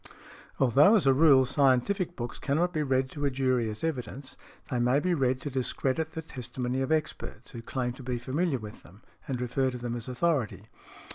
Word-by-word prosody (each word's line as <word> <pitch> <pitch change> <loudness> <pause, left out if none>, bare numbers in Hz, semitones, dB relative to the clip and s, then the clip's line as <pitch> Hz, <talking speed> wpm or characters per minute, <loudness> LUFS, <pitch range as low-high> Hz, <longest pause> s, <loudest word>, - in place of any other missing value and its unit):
Although, 140 - +6
as 205 - +2
a 135 - +6
rule, 135 -2 +6
scientific 145 - +2
books 120 0 -6
cannot 170 +6 0
be 155 - 0
read 130 -2 +1
to 145 - -6
a - - +3
jury 130 -3 0
as 105 +6 -7
evidence, 135 -3 -4 0.4
they 125 - 0
may 125 +3 +3
be 180 +3 0
read 130 -4 +1
to 145 - -5
discredit 135 +4 -1
the 160 - -5
testimony 125 -2 -4
of 135 - -2
experts, 155 -2 -3
who 115 - -7
claim 125 +1 -3
to 130 - -12
be 125 -1 -3
familiar 140 +5 -1
with 105 -2 -10
them 100 +6 -18 0.2
and 130 -3 -2
refer 130 +2 0
to 125 - -5
them 120 -1 -4
as 120 0 -6
authority. 130 - 0
130 Hz, 200 wpm, -28 LUFS, 125-150 Hz, 0.4 s, Although